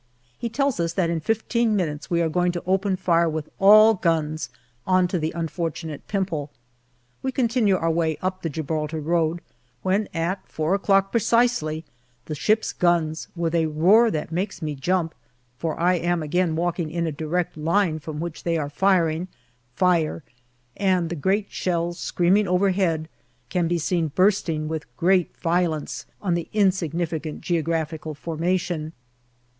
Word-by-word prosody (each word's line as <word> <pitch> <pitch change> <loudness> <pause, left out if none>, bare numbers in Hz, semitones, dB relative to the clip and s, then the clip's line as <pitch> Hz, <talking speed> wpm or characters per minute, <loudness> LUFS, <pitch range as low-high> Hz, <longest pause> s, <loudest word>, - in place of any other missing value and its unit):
He 235 - -4
tells 275 -1 0
us 170 0 0
that 170 -3 +1
in 165 - -1
fifteen 225 +4 0
minutes 155 -6 -2
we 170 -1 +2
are - - +2
going 175 +2 +1
to 175 - -4
open 190 +1 +1
fire 170 -2 +2
with 155 -1 -4
all 215 +3 +8
guns 160 -4 -1 0.4
on 185 -1 +4
to 180 - -1
the 155 +1 -1
unfortunate 165 -2 -4
Pimple. 180 -8 -2 0.7
We 265 - -1
continue 235 -5 +2
our 165 -1 0
way 160 -1 0
up 185 0 -3
the 165 - -2
Gibraltar 155 +1 -3
road, 165 +1 0 0.4
when 195 +3 +1
at 175 +4 -2
four 160 +3 -1
o'clock 195 -1 +2
precisely 230 -9 +1 0.4
the 155 - -5
ships' 215 +10 +1
guns 165 -3 +1
with 170 -1 -1
a 165 -1 +2
roar 185 +10 +5
that 155 -4 -3
makes 185 +3 -2
me 155 -3 -3
jump, 165 +4 -1 0.5
for 160 -2 -3
I 175 +1 +3
am 175 -1 0
again 165 +2 0
walking 170 -1 -1
in 170 +1 -2
a 160 - -1
direct 160 +4 -2
line 160 +1 +1
from 150 0 -6
which 170 0 -5
they 170 -1 0
are 145 -2 -2
firing 170 -1 +2 0.5
fire, 170 -3 +1 0.5
and 185 -4 +1
the - - -2
great 195 +6 0
shells 175 -1 -1
screaming 190 +4 +2
overhead 180 -3 +1 0.4
can 175 -2 0
be 175 +1 +1
seen 170 0 0
bursting 165 -2 +1
with 155 -6 -6
great 180 0 +2
violence 165 -3 -1 0.2
on 185 -4 +1
the 170 -1 -2
insignificant 170 -5 0
geographical 160 -2 -2
formation. 165 0 -2
170 Hz, 155 wpm, -24 LUFS, 160-190 Hz, 0.7 s, all